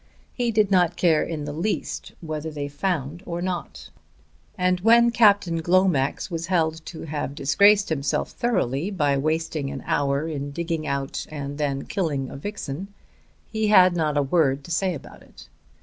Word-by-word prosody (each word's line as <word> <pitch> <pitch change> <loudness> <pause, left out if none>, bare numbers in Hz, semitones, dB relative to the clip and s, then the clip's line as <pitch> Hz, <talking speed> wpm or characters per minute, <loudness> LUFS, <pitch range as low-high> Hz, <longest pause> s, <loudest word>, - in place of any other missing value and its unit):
He 245 -2 -1
did 215 -3 +2
not 180 -3 +3
care 165 -4 +3
in 155 -3 -4
the 145 - -5
least 175 +8 -3
whether 155 -1 -4
they 145 -2 -4
found 150 0 -3
or 170 -1 -3
not; 175 - -5 0.7
and 180 -1 +1
when 235 +4 +5
Captain 200 -8 +4
Glomax 175 -6 +1
was 165 0 -3
held 160 -3 0
to 165 - -7
have 145 -2 -4
disgraced 200 +9 +4
himself 140 -3 -1
thoroughly 180 - -1
by 150 -8 +1
wasting 155 0 -1
an 135 -1 -6
hour 140 +2 0
in 145 -3 -4
digging 165 +1 -3
out 140 -1 -3
and 145 -1 -6
then 140 -2 -1
killing 145 -9 -2
a - - -8
vixen, 175 +1 -5 0.6
he 220 -1 -1
had 185 -4 +6
not 155 -3 0
a 145 - +3
word 140 -2 +1
to 170 - -10
say 185 +1 0
about 140 - -12
it. - - -16
160 Hz, 165 wpm, -24 LUFS, 145-185 Hz, 0.7 s, had